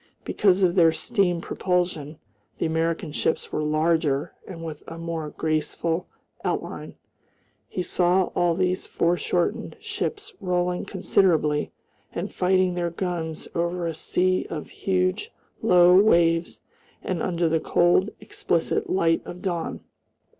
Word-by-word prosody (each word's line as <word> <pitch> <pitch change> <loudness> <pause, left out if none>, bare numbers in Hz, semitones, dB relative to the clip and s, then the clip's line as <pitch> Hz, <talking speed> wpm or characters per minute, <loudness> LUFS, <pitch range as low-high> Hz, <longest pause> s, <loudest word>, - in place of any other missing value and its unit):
Because 195 -1 +3
of 175 -2 +4
their 170 -3 +5
steam 180 -3 0
propulsion, 175 -5 -1 0.4
the - - -1
American 160 0 -1
ships 155 - -1
were - - -1
larger 155 -2 +1
and 165 -3 -8
with 155 -2 -6
a 165 - -7
more 165 -2 -4
graceful 160 +3 -1 0.4
outline. - - -3 0.7
He 180 - -3
saw 180 +1 +2
all 175 -1 +2
these 185 0 0
foreshortened 175 - 0
ships 430 -1 -4
rolling 180 -1 0
considerably 170 -6 +1 0.4
and - - -4
fighting 185 0 +2
their 175 -1 -1
guns 170 -2 -4
over 170 +1 -1
a 165 - -1
sea 185 +3 0
of 155 -2 -5
huge 185 - -1 0.3
low 180 0 +6
waves 170 -4 +3 0.4
and 180 -3 -2
under 175 -2 0
the 160 0 +2
cold, 175 +5 +3
explicit 430 -3 -1
light 165 - +2
of 180 - -9
dawn. 175 -4 -3
175 Hz, 125 wpm, -25 LUFS, 165-185 Hz, 0.7 s, low